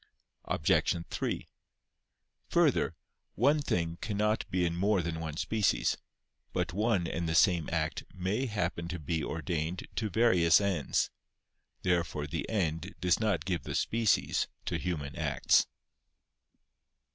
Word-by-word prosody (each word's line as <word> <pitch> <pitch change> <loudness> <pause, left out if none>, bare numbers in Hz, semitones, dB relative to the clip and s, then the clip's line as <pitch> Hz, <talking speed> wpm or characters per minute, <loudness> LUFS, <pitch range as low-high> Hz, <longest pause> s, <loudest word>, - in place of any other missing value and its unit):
Obj. 75 - +2 0.2
3: - - -2 1.0
Further, - - +3 0.4
one 150 +1 +3
thing 85 -9 -1
cannot 105 +1 0
be 90 -1 +1
in 85 0 -1
more 95 0 +2
than 80 -1 -3
one 80 -2 -5
species. 110 +1 +1 0.6
But 85 - -1
one 105 -2 +1
and 85 0 -2
the 80 - 0
same 85 -2 +4
act 80 -1 -1
may 100 +9 -1
happen 90 -6 -2
to 90 +1 -4
be 80 0 -2
ordained 85 +2 -3
to 110 -1 0
various 90 -5 +5
ends. 95 -7 0 0.7
Therefore 85 -5 0
the 80 +3 -4
end 80 -7 -1
does 90 -1 +2
not 105 -6 0
give 90 -4 -1
the - - -5
species 115 -2 +2 0.2
to - - -1
human 75 -6 -3
acts. - - +3
90 Hz, 130 wpm, -31 LUFS, 80-105 Hz, 1.0 s, various